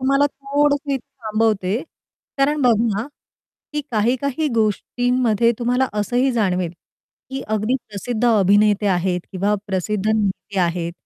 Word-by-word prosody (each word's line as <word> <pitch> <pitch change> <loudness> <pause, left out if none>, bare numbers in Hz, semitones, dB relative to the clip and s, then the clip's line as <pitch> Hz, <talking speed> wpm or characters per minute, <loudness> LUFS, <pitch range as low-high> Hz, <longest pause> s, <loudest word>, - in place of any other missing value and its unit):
तुम्हाला 275 +2 +3
थोडसं 285 +1 0
इथं 270 - -3 0.2
थांबवते 215 -3 +1 0.6
कारण 290 +2 +2
बघा, 225 -3 +2 0.7
की 300 - -1
काही-काही 255 +7 0
गोष्टींमध्ये 235 +1 +1
तुम्हाला 250 +2 +1
असंही 245 +5 +1
जाणवेल 185 -6 0 0.6
की 270 - -4
अगदी 215 +4 0
प्रसिद्ध 220 +3 -3
अभिनेते 205 -1 +4
आहेत 180 -1 +1
किंवा 200 +2 +1
प्रसिद्ध 195 +2 -2
नेते 200 -2 -1
आहेत 170 -1 -1
220 Hz, 115 wpm, -21 LUFS, 200-255 Hz, 0.7 s, अभिनेते